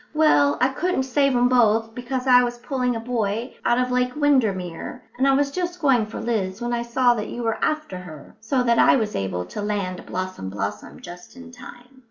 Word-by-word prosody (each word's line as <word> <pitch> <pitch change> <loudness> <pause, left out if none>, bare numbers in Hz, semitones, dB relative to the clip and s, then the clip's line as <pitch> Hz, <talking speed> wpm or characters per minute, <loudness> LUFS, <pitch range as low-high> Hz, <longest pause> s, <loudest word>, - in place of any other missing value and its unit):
"Well, 145 - +4
I 255 - +3
couldn't 315 +1 -1
save 275 0 +1
'em 245 0 +4
both, 225 -2 +2
because 250 +2 -4
I 250 -1 +6
was 240 0 -3
pulling 250 -1 -2
a - - -3
boy 230 0 -3
out 240 - +2
of 250 0 0
Lake 250 0 0
Windermere; 220 - 0 0.2
and 270 - +3
I 275 - +4
was 280 0 +1
just 350 +1 -3
going 260 -8 +2
for 215 - -7
Liz 205 -4 -2
when 240 0 -3
I 235 - 0
saw 240 +1 +2
that 215 -3 -4
you 240 - -5
were 225 -1 -2
after 305 -12 -2
her, 160 -5 -12
so 250 +3 0
that 235 -1 +2
I - - +6
was 220 -5 -1
able 90 -2 -2
to 150 - -7
land 200 -3 -3
Blossom 185 - -5
blossom 95 -6 -5
just 175 +5 -11
in 255 -1 -12
time." 250 +1 -14
240 Hz, 215 wpm, -23 LUFS, 205-260 Hz, 0.2 s, I